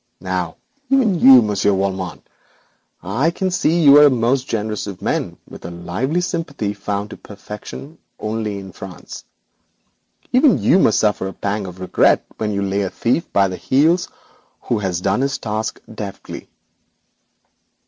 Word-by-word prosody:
Now 90 -3 -3 0.3
even 240 -10 +3
you, 130 -4 +8
Monsieur 105 -1 +1
Valmont 95 -5 -3 0.8
(I 115 - +1
can 185 +2 -2
see 170 -1 +2
you 145 0 +9
are 150 - +8
the - - +7
most 125 +1 +1
generous 105 -1 -3
of 95 -3 -7
men, - - -2
with - - -12
a 85 - -6
lively 90 - -2
sympathy 165 - -3
found 100 0 -4
to - - -8
perfection 105 +9 -10 0.2
only 110 -1 -3
in 95 -1 -9
France), 95 -1 -10 1.1
even 260 +2 +5
you 190 - +3
must 110 - +4
suffer 105 -3 +1
a 95 - -6
pang 100 -1 -3
of 90 0 -10
regret 95 - +2
when 110 -1 -2
you 100 -1 -1
lay 100 +1 -1
a 95 - -1
thief 125 - -1
by 100 0 +3
the 90 -1 -5
heels 160 +7 +2 0.5
who 120 - -1
has 90 -4 -2
done 100 +5 +1
his 135 0 0
task 110 0 -3
deftly.' 105 -3 -8
105 Hz, 160 wpm, -19 LUFS, 95-140 Hz, 1.1 s, you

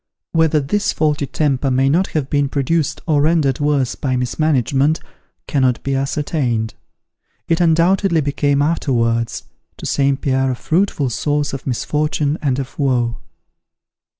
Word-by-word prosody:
Whether 160 -2 +3
this 200 +9 0
faulty 150 -2 0
temper 140 -2 0
may 130 +1 +2
not 170 +7 +2
have 140 -3 -1
been 145 -1 0
produced 155 +3 -1
or 150 -3 +2
rendered 150 -4 +2
worse 145 -4 +1
by 130 -2 -2
mismanagement, 140 +2 +1 0.5
cannot 130 -4 +2
not - - -20
be 135 - -1
ascertained. 135 -4 -1 0.7
It, 165 +1 +1
undoubtedly 170 +1 +3
became 145 0 +1
afterwards, 115 -7 0 0.3
to - - -8
St. 140 0 +1
Pierre 130 -2 +1
a 130 - -1
fruitful 155 -3 0
source 145 +3 -1
of 135 - -6
misfortune 150 +3 -1
and 135 -4 0
of 135 +1 -6
woe. 120 -4 0
145 Hz, 140 wpm, -18 LUFS, 130-155 Hz, 0.7 s, Whether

